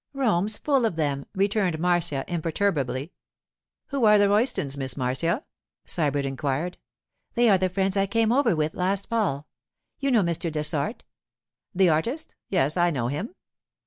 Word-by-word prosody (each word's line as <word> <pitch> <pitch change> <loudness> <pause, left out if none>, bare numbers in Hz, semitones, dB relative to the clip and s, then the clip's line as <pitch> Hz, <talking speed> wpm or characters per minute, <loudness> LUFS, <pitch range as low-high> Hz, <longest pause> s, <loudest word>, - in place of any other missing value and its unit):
'Rome's 215 -6 0
full 275 -4 +1
of 180 - -4
them,' 145 -3 -2
returned 195 -3 +1
Marcia 170 -5 +1
imperturbably. 160 -4 -1 0.8
'Who 275 -3 -2
are 210 0 +7
the 205 -1 +4
Roystons, 205 - +2
Miss 135 -2 -3
Marcia?' 155 - 0 0.4
Sybert 145 -4 +1
inquired. 140 +5 -3 0.6
'They 240 -1 +4
are 190 - +4
the 185 0 +1
friends 195 +1 0
I 195 0 +2
came 225 +2 +1
over 245 -6 +3
with 155 0 -1
last 190 +2 -1
fall. 190 -11 -1 0.5
You 275 - 0
know 230 -6 +4
Mr. 170 -1 0
Dessart?' 150 - -1 0.7
'The 190 -1 +4
artist? 230 - -1 0.2
Yes, 150 -3 +1
I 175 0 +3
know 125 -7 -2
him. 200 - -4
175 Hz, 150 wpm, -25 LUFS, 150-210 Hz, 0.8 s, are